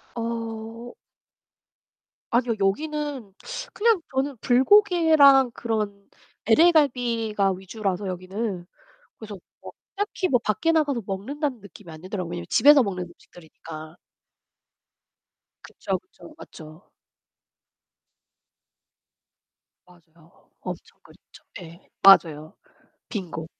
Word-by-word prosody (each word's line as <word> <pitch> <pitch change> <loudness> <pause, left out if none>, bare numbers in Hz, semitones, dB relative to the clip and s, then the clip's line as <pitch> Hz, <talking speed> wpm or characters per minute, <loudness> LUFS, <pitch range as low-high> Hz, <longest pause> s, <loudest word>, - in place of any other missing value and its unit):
어. 230 0 -6 1.4
아니요. 240 -1 +2
여기는 280 0 -2 0.4
그냥 440 -4 +2
저는 270 -1 -1
불고기랑 280 - +5
그런 210 -3 -4 0.4
LA 325 +11 +5
갈비가 230 - +1
위주라서, 190 +1 -4
여기는. 185 +1 -5 0.5
그래서 210 -3 -9 0.2
뭐 - - -10 0.2
딱히 395 -2 -2
뭐 245 -7 +2
밖에 325 - 0
나가서 285 -6 +1
먹는다는 255 +7 -4
느낌이 200 -2 -14
안 155 0 -12
들더라고요. 185 -2 -5
왜냐하면 85 - -6
집에서 285 -2 +6
먹는 185 -3 -4
음식들이니까. 160 -2 -13 1.7
그쵸. 190 -1 -4
그쵸. 175 -2 -17
맞죠. 155 +3 -14 2.9
맞아요. 170 -2 -23 0.3
엄청 - - -8
그렇죠. - - -20 0.2
네. 170 0 -12 0.2
맞아요. 160 -5 +5 0.5
빙고. 170 -6 -6
215 Hz, 225 characters per minute, -24 LUFS, 180-270 Hz, 2.9 s, 집에서